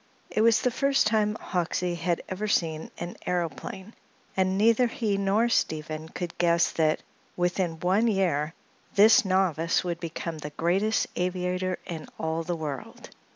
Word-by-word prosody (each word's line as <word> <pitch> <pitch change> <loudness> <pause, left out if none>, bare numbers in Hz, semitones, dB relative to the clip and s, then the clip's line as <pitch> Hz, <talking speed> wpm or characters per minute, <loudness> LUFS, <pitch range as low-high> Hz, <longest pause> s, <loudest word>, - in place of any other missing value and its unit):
It - - +1
was 225 -1 +4
the 250 - +2
first 275 +2 +2
time 215 -1 +2
Hoxsey 180 0 -1
had 170 0 -1
ever 195 +3 -3
seen 160 -5 0
an 175 +1 -6
aëroplane, 180 +4 -3 0.4
and 190 0 +1
neither 230 +4 +4
he 230 -5 -1
nor 200 +4 +2
Stephen 155 -7 -1
could 175 0 -5
guess 170 0 +3
that 155 -1 +1 0.3
within 175 -2 0
one 195 +6 +3
year 170 -7 +1 0.4
this 215 +2 +7
novice 185 -4 +1
would 170 -2 -3
become 165 -1 -5
the 150 - -5
greatest 195 +6 +2
aviator 180 0 -1
in 160 -3 -6
all 160 +1 -1
the 175 +1 -2
world. 150 -4 -6
180 Hz, 150 wpm, -27 LUFS, 165-205 Hz, 0.4 s, this